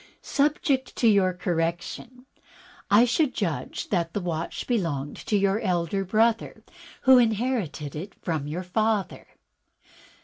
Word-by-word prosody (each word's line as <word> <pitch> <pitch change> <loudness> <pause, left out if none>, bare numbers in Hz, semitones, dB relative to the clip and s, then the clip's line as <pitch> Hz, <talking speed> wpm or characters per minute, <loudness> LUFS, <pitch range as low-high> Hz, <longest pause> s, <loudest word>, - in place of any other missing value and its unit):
"Subject 280 -2 0
to 235 - +2
your 200 -4 +4
correction, 175 +8 -3 0.6
I 210 +4 +6
should 255 +3 +1
judge 170 -7 -3
that 170 -4 -1
the - - -1
watch 170 -3 -4
belonged 165 - -2
to 210 - +2
your 200 +1 +2
elder 185 -1 -1
brother, 225 +4 +1 0.4
who 260 -1 +7
inherited 220 - -1
it 180 +7 -7
from 155 -5 -3
your 170 +5 -4
father." 215 +2 -1
195 Hz, 125 wpm, -26 LUFS, 170-235 Hz, 0.6 s, who